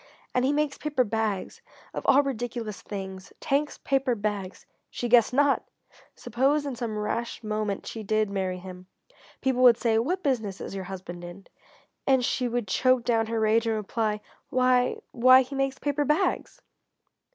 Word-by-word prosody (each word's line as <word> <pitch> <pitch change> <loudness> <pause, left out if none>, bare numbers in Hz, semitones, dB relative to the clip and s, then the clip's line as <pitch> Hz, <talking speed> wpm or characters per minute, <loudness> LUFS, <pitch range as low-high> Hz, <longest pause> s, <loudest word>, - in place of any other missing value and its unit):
And 250 - +2
he 265 - +3
makes 295 -1 -1
paper 295 -4 +1
bags 215 -3 -2 0.3
of - - -4
all 285 +2 +6
ridiculous 240 -5 -4
things! 190 -2 -7
Tank's 290 +2 0
Paper 270 -3 0
Bags!" 205 -3 -4 0.2
she 240 - -4
guessed 235 -1 +5
not! 280 +2 +3 0.5
Suppose 270 +5 +1
in 275 -3 -3
some 225 -2 -4
rash 230 +3 -3
moment 215 -2 -2
she 225 - -6
did 215 +1 +1
marry 190 -2 -2
him. 180 0 -10 0.5
People 260 -1 +1
would 245 -2 +7
say: 225 -2 +2
"What 360 +11 -1
business 220 -8 -1
is - - -6
your 190 -1 -5
husband 180 -2 -8
in?" 175 +3 -10 0.6
And 265 -2 +4
she 250 0 0
would 240 -2 -2
choke 255 +5 +2
down 225 -2 +1
her 230 0 -1
rage 220 +1 +2
and 225 - +1
reply 215 0 -2 0.3
"Why 255 -1 +2
why 255 +2 +6
he 260 - -10
makes 270 0 -1
paper 290 0 -1
bags!" 300 +7 0
235 Hz, 165 wpm, -27 LUFS, 210-260 Hz, 0.6 s, would